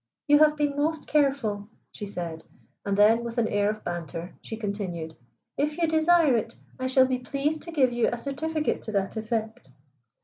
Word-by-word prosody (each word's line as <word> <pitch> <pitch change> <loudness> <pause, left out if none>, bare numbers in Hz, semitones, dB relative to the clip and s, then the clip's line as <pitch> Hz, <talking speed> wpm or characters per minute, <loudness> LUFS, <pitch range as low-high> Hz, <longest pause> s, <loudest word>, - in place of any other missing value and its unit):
"You 295 0 +6
have 305 0 +5
been 290 -1 0
most 310 +2 -1
careful," 270 -9 +1 0.2
she 205 - -7
said. 170 -4 -5 0.4
And 200 -1 -1
then, 220 +3 +5
with 235 0 -6
an 230 -2 +2
air 205 -1 +1
of 215 0 -4
banter, 170 0 -5
she 220 - -7
continued: 190 -7 -4 0.4
"If 300 +2 0
you 335 -1 +2
desire 320 -3 +4
it, 230 0 -2 0.2
I 255 - -1
shall 260 0 +5
be 255 -1 -1
pleased 280 +4 -2
to 335 - -8
give 265 -6 +2
you 240 -1 +2
a 240 - -2
certificate 300 +5 -2
to 220 - -6
that 195 -1 -1
effect." 220 - -3
235 Hz, 190 wpm, -26 LUFS, 205-295 Hz, 0.4 s, You